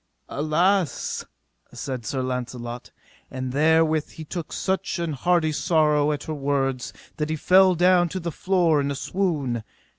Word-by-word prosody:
Alas, 165 +4 0 0.5
said 125 -5 -5
Sir 130 -2 -2
Launcelot; 125 -1 -5 0.4
and 130 -1 -4
therewith 155 +2 +3
he 160 - -9
took 170 0 -6
such 190 -2 -2
an 170 -2 -2
heartly 170 +2 +1
sorrow 150 -2 +2
at 145 -1 -3
her 155 - -4
words 135 -3 -1 0.3
that 150 0 -2
he 160 - 0
fell 185 +3 +5
down 175 0 +4
to 185 - -4
the 170 -1 -4
floor 175 -4 +2
in 140 - -1
a 140 - -2
swoon. 140 - -1
155 Hz, 150 wpm, -24 LUFS, 135-175 Hz, 0.5 s, fell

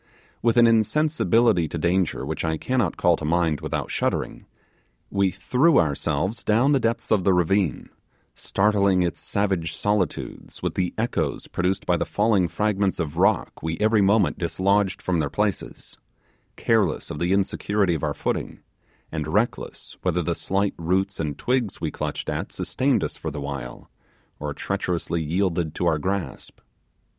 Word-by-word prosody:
With 115 0 +2
an 120 - +7
insensibility 115 - +3
to 85 - -5
danger 85 -2 0
which 80 +1 -3
I 80 -1 0
cannot 120 -3 0
call 85 -2 +3
to - - -9
mind 80 -1 +1
without - - -3
shuddering, - - -2 0.6
we 100 -1 +2
threw 125 - +2
ourselves 80 +6 0
down 120 +6 +3
the 140 - +4
depths 115 -1 -1
of 105 -4 +3
the 95 - +4
ravine, 90 -3 +1 0.5
startling 100 -2 +2
its 85 - -3
savage 95 -6 -1
solitudes 105 -3 -2
with - - -1
the 90 -2 -1
echoes 115 +2 -1
produced 95 +2 -1
by 90 - +2
the - - -1
falling 105 -4 +2
fragments 100 +2 0
of 80 -4 -3
rock - - +1
we 80 +1 -3
every 110 0 +3
moment 100 0 +3
dislodged 95 +2 +1
from 90 -2 0
their 70 -2 0
places, 105 +3 -3 0.6
careless - - +1
of - - -5
the 85 +1 0
insecurity 100 0 +1
of 80 - -2
our - - -1
footing, - - -3 0.5
and 80 -1 -3
reckless 105 +9 -2
whether 90 -1 0
the 85 - 0
slight 95 +5 -1
roots 95 +3 0
and 75 -3 -2
twigs 125 -5 -1
we - - -2
clutched - - -4
at - - -3
sustained 135 -1 0
us - - -4
for - - -4
the 75 - -6
while, 70 -4 -6 0.5
or - - -3
treacherously 90 -3 -2
yielded 85 -1 -1
to 90 - -1
our 80 -3 +2
grasp. 95 +2 -4
95 Hz, 160 wpm, -24 LUFS, 85-105 Hz, 0.6 s, an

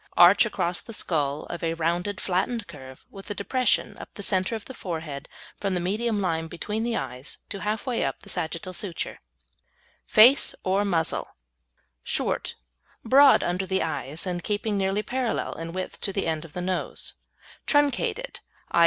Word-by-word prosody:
Arch 185 +5 +8
across 175 -4 0
the 230 - -9
skull 150 -7 0
of 170 - -6
a 165 0 0
rounded, 175 +4 -1
flattened 200 +5 0
curve, 130 -6 -12
with 195 +1 -8
a 205 - -3
depression 250 +4 +1
up - - -9
the 205 - -5
centre 190 +3 0
of 220 - -6
the 260 - -8
forehead 160 - -5 0.3
from 195 -2 0
the - - +1
medium 210 +5 0
line 165 -4 0
between 210 +6 -3
the 235 -1 0
eyes, 125 +3 -6
to 200 - -4
half 210 +2 -2
way 250 -3 0
up - - -2
the - - -14
sagittal 170 +1 -3
suture. 185 -2 -3 0.9
FACE 245 +7 +7
OR 190 +2 +2
MUZZLE 170 -5 0 0.8
Short, - - -1 0.5
broad 275 +4 +7
under 180 +2 -1
the 190 +1 +1
eyes, 155 0 -2
and 175 -2 -3
keeping 210 0 -1
nearly 195 +1 +1
parallel 250 -1 -1
in 165 0 -6
width 185 +1 -5
to 195 - -1
the 195 0 -1
end 160 0 -1
of 155 - -13
the 180 - -3
nose; 185 +1 -2 0.5
truncated, 290 - +1 0.3
_i. - - +4
190 Hz, 170 wpm, -26 LUFS, 165-215 Hz, 0.9 s, Arch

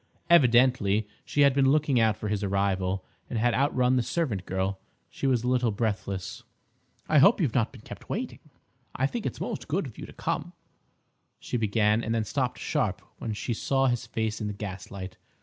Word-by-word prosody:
Evidently 120 -8 +4 0.2
she 145 - 0
had 140 -1 +6
been 135 -1 +4
looking 145 -4 +3
out 110 -2 +3
for 105 - -4
his 105 -1 -1
arrival, 95 -1 0 0.2
and 120 - -2
had 120 +2 +2
outrun 130 -2 +2
the - - +3
servant 115 - -2
girl. 95 +1 -1 0.3
She - - -2
was 125 -3 +2
a - - -1
little 125 -1 +2
breathless. 100 -3 -3 0.7
"I 155 - +5
hope 200 +12 +6
you've 145 - +1
not 115 -2 +1
been 125 - -13
kept - - -11
waiting—I 135 - -6
think 220 - -2
it's - - -5
most 220 - -4
good 175 +5 0
of 120 -6 -10
you - - -7
to - - -12
come—" - - -3 0.9
she - - -5
began, 110 0 +2
and 115 +1 -1
then 115 - +1
stopped 105 - -1
sharp - - -1 0.2
when 110 - -3
she 110 +3 -3
saw 135 +4 +1
his 120 -3 0
face 110 0 -2
in 105 - -2
the 105 - -3
gaslight. 95 -1 -7
115 Hz, 190 wpm, -27 LUFS, 105-130 Hz, 0.9 s, had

